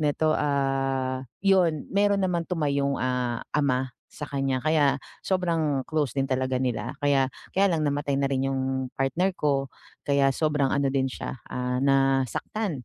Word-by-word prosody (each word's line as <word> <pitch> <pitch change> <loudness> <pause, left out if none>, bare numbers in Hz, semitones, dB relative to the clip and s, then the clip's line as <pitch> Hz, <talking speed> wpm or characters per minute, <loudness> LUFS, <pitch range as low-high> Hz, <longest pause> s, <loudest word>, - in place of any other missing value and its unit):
nito, 155 +1 +2
ah, 135 -2 0 0.2
yun 180 -6 +3
meron 200 0 +3
naman 175 -2 0
tumayong, 140 -5 0
ah, 125 -2 -1
ama 130 -3 +1 0.2
sa - - -9
kanya 135 -2 -1
kaya 150 -3 +3 0.3
sobrang 165 -7 0
close 155 -5 0
din 135 - +2
talaga 130 0 0
nila, 120 -1 -2
kaya 135 -2 +3 0.3
kaya 195 +1 +4
lang 165 -3 0
namatay 145 0 0
na 140 - +1
rin 135 0 0
yung 130 -1 -1
partner 160 +8 +1
ko, 140 -2 0 0.4
kaya 140 -1 +4
sobrang 150 -2 +1
ano 140 -1 +2
din 135 -1 +1
siya, 130 - -6
ah, 125 0 -2
nasaktan, 135 - +1
140 Hz, 150 wpm, -26 LUFS, 130-155 Hz, 0.4 s, kaya